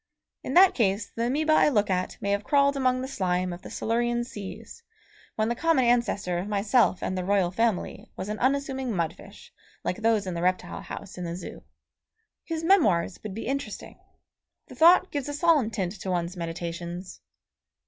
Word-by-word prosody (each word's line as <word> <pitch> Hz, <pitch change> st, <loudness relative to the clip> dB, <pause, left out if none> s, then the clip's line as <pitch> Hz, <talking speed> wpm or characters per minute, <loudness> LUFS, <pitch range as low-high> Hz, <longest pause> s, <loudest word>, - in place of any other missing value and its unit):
In -, -, -4 dB
that 375 Hz, +1 st, +7 dB
case 205 Hz, -2 st, 0 dB
the 230 Hz, +1 st, 0 dB
amoeba 310 Hz, +5 st, +2 dB
I 310 Hz, -, +5 dB
look 210 Hz, -7 st, +1 dB
at 185 Hz, 0 st, -1 dB
may 200 Hz, -, -2 dB
have 200 Hz, +1 st, 0 dB
crawled 280 Hz, +1 st, +3 dB
among 255 Hz, -2 st, +1 dB
the 260 Hz, -, -4 dB
slime 180 Hz, -7 st, -1 dB
of 175 Hz, -, -9 dB
the -, -, -10 dB
Silurian 240 Hz, +1 st, 0 dB
seas 210 Hz, -, -9 dB, 0.5 s
when 215 Hz, 0 st, 0 dB
the 235 Hz, -, +1 dB
common 315 Hz, 0 st, +2 dB
ancestor 235 Hz, -7 st, +1 dB
of 185 Hz, -, -4 dB
myself 210 Hz, 0 st, +2 dB
and 185 Hz, -, -2 dB
the 185 Hz, -, -2 dB
royal 190 Hz, -2 st, +2 dB
family 225 Hz, 0 st, -1 dB
was 190 Hz, -, -4 dB
an 210 Hz, +1 st, -4 dB
unassuming 265 Hz, -2 st, 0 dB
mud 170 Hz, -3 st, -1 dB
fish -, -, -15 dB, 0.3 s
like 180 Hz, -, -2 dB
those 225 Hz, -2 st, +1 dB
in 185 Hz, -, -3 dB
the 170 Hz, -, -3 dB
reptile 180 Hz, 0 st, -1 dB
house 185 Hz, -, -8 dB
in -, -, -4 dB
the 170 Hz, 0 st, -4 dB
Zoo. 185 Hz, -, -8 dB, 0.8 s
His 325 Hz, -1 st, -4 dB
memoirs 210 Hz, -, +3 dB
would 210 Hz, -3 st, -7 dB
be 225 Hz, -, -5 dB
interesting. 275 Hz, +3 st, -5 dB, 0.7 s
The -, -, -11 dB
thought 350 Hz, +3 st, +6 dB
gives 285 Hz, -1 st, -3 dB
a 290 Hz, -, -3 dB
solemn 300 Hz, -7 st, +3 dB
tint 195 Hz, -5 st, -2 dB
to 190 Hz, -, -4 dB
one's 175 Hz, 0 st, -1 dB
meditations. 170 Hz, +1 st, -6 dB
215 Hz, 190 wpm, -26 LUFS, 185-265 Hz, 0.8 s, that